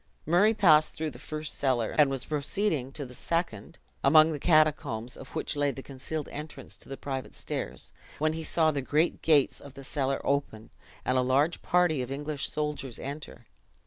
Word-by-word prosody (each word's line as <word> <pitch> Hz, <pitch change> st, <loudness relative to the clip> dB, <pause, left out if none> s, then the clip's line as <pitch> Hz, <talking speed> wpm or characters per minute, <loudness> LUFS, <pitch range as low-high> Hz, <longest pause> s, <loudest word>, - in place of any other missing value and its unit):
Murray 200 Hz, +8 st, +4 dB
passed 155 Hz, -7 st, +5 dB
through 155 Hz, -1 st, -3 dB
the -, -, -12 dB
first 155 Hz, -1 st, -4 dB
cellar, 125 Hz, -5 st, 0 dB
and 150 Hz, -2 st, +5 dB
was 135 Hz, -2 st, -3 dB
proceeding 150 Hz, -1 st, -1 dB
to 145 Hz, -, -4 dB
the 125 Hz, -, -11 dB
second 165 Hz, -, -3 dB, 0.3 s
(among 155 Hz, +3 st, +7 dB
the 150 Hz, -, -4 dB
catacombs 150 Hz, -7 st, +2 dB
of 135 Hz, -, -10 dB
which -, -, -2 dB
lay 145 Hz, 0 st, +2 dB
the 135 Hz, -1 st, -6 dB
concealed 145 Hz, +3 st, -5 dB
entrance 150 Hz, +1 st, -7 dB
to -, -, -14 dB
the 135 Hz, -, -6 dB
private 135 Hz, -2 st, -5 dB
stairs), -, -, -5 dB, 0.2 s
when 155 Hz, +1 st, +1 dB
he 160 Hz, 0 st, -4 dB
saw 160 Hz, 0 st, +2 dB
the 140 Hz, -2 st, -2 dB
great 150 Hz, +5 st, +1 dB
gates 150 Hz, -4 st, +3 dB
of 140 Hz, -1 st, -12 dB
the 135 Hz, -, -9 dB
cellar 135 Hz, -1 st, -1 dB
open, 120 Hz, -6 st, -2 dB, 0.3 s
and 130 Hz, 0 st, +2 dB
a -, -, +4 dB
large 135 Hz, +6 st, +2 dB
party 175 Hz, -6 st, +2 dB
of 125 Hz, -, -4 dB
English 145 Hz, +1 st, -3 dB
soldiers 150 Hz, -5 st, -3 dB
enter. 140 Hz, -4 st, -7 dB
145 Hz, 185 wpm, -28 LUFS, 135-155 Hz, 0.3 s, among